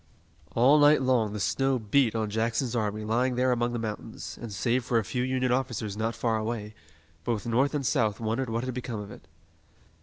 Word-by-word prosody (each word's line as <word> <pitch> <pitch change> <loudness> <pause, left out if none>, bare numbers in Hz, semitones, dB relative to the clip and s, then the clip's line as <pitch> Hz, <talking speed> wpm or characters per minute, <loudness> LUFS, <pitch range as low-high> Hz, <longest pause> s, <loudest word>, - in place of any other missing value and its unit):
All 135 +6 +6
night 145 -1 +6
long 120 -5 +2
the 105 - -4
snow 135 +4 +1
beat 115 +1 +2
on 110 -2 -1
Jackson's 115 +3 0
army 105 -1 -1
lying 120 +4 +1
there 125 +1 +2
among 120 0 +1
the 120 - -2
mountains, 110 -2 -6
and 115 -2 -6
save 120 +6 0
for 120 -1 +1
a 115 - +2
few 125 +5 -2
Union 130 0 0
officers 120 -5 -1
not 110 +1 -2
far 115 0 0
away, 110 -1 -4 0.5
both 105 +1 -2
North 130 +6 +1
and 140 -2 -1
South 115 -8 +1
wondered 115 +3 -1
what 115 +1 -1
had 130 0 -3
become 120 -3 -4
of 105 0 -8
it. - - -13
115 Hz, 205 wpm, -28 LUFS, 110-130 Hz, 0.5 s, All